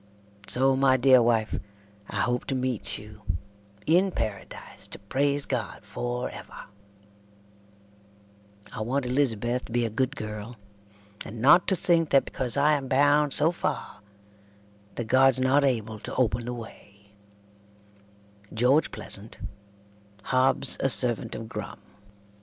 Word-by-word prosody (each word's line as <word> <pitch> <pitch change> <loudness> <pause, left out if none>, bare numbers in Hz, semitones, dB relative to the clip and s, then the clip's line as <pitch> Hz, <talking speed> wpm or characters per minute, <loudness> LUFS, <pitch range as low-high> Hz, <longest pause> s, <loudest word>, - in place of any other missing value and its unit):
So 135 +1 +2
my 130 -1 +3
dear 130 0 +6
wife 115 -2 +1 0.5
I - - -2
hope 125 0 -1
to 135 - -2
meet 130 -3 -2
you 105 0 -13 0.6
In 180 +5 +3
paradase 110 - -5
to - - -6
prase 140 +7 -1
god 120 -5 -4
forever 120 +4 -5 2.1
I 115 - -5
want 130 +4 -1
Elizabeth 125 -2 0
to - - -13
be 120 0 +1
a 115 - -3
good 130 +5 -1
girl 105 0 -7 0.7
and 110 +2 -9
not 150 +9 +5
to 190 - +2
thinke 170 -3 +1
that 135 - +4
becasue 130 +1 -1
I 150 +2 +4
am 140 -3 -1
bound 145 +2 +3
so 155 +3 +4
fare 170 -10 -4 1.0
that 120 - -3
gods 130 +2 +4
not 130 +3 +3
abble 110 -5 -1
to - - -7
open 120 -2 0
the 125 - -4
way 100 -3 -13 1.4
"GEORGE 125 +7 +3
PLEASANT, 105 +2 -7 0.9
"Hobbs 130 +2 +5
a 135 - +1
servant 120 -3 -1
of 115 - -7
Grum." - - -7
125 Hz, 130 wpm, -26 LUFS, 115-135 Hz, 2.1 s, dear